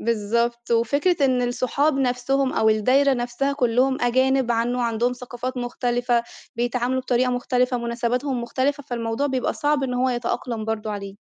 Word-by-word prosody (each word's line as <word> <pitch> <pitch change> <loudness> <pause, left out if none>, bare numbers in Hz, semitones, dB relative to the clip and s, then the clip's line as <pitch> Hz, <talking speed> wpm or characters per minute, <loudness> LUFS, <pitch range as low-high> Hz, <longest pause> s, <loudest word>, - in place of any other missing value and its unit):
بالضبط، 235 +2 -1
وفكرة 285 +10 +2
إن 255 -2 +2
الصُحاب 255 +4 +1
نفسهم، 260 +1 0
أو 220 - +2
الدَّايرة 255 +6 +3
نفسها 245 +3 -1
كُلُّهم 260 0 +1
أجانب 260 +1 +2
عنه 240 +2 0
عندهم 235 +1 0
ثقافات 250 +1 -6
مختلفة، 245 -1 0 0.3
بيتعاملوا 245 +2 0
بطريقة 255 0 +1
مختلفة 250 0 0
مُناسباتهُم 240 +2 -2
مختلفة، 270 +5 -1
فالموضوع 235 +1 -2
بيبقى 260 -2 -1
صعب 295 -2 0
إن 250 -2 -1
هو 255 +1 +1
يتأقلم 240 -2 -2
برضو 220 0 -3
عليه. 200 -1 -6
245 Hz, 145 wpm, -23 LUFS, 235-260 Hz, 0.3 s, الدَّايرة